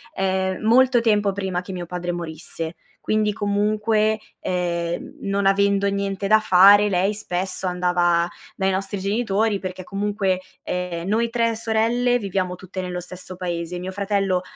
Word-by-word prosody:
ehm, 190 -1 0
molto 250 +1 +5
tempo 205 -3 +2
prima 190 -2 -2
che 190 +1 -8
mio 175 -1 -5
padre 175 0 -4
morisse. 165 0 -5 0.3
Quindi 215 -1 +1
comunque, 215 +1 +1 0.2
ehm, 170 -2 -2
non 195 0 0
avendo 200 0 +3
niente 200 0 -2
da 215 +1 +6
fare 205 +1 +7
lei 195 +2 +1
spesso 185 -1 -3
andava 175 -1 +2 0.3
dai 190 0 +1
nostri 195 +1 -2
genitori 205 +1 0
perché 185 -1 -6
comunque, 195 -1 -1 0.2
ehm, 180 -1 -3
noi 230 +3 +1
3 230 -1 +1
sorelle 230 +2 +1
viviamo 185 -3 -2
tutte 185 +1 -8
nello 180 -1 -3
stesso 180 +1 -9
paese. 175 -1 -3
Mio 185 +1 -5
fratello, 195 -2 0
195 Hz, 145 wpm, -22 LUFS, 180-210 Hz, 0.3 s, fare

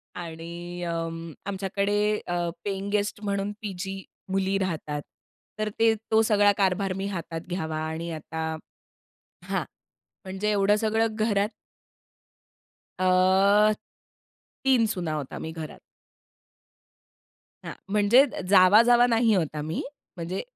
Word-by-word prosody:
आणि 170 +1 -7
अं, 165 -1 -4
आमच्याकडे 200 +1 -1 0.3
अ, 175 -1 -1 0.2
पेइंगगेस्ट 200 +1 -2
म्हणून 200 0 -1
पी-जी 195 -1 -5 0.3
मुली 195 0 +1
राहतात. 155 -5 -3 0.6
तर 215 - 0
ते 225 0 +5 0.2
तो 220 0 +5
सगळा 205 -1 +4
कारभार 195 0 +1
मी 195 - -3
हातात 170 -4 -5
घ्यावा 160 -3 -3
आणि 165 +2 -4
आता 160 0 -5 1.0
हां. - - -1 0.6
म्हणजे 195 +3 -2
एवढं 205 0 +3
सगळं 220 0 0
घरात 210 -1 +1 1.5
अह, 190 +3 +4 0.9
3 250 -4 +4
सुना 175 -3 -3
आहोत 150 -4 -4
आम्ही 160 - -5
घरात. 160 -2 -8 1.9
हां. - - -5 0.2
म्हणजे 210 +6 +5 0.2
जावा-जावा 220 +6 +7
नाही 230 -1 +3
आहोत 160 -4 -1
आम्ही, 155 +2 -3 0.4
म्हणजे 175 +3 -3
195 Hz, 110 wpm, -26 LUFS, 170-210 Hz, 1.9 s, जावा-जावा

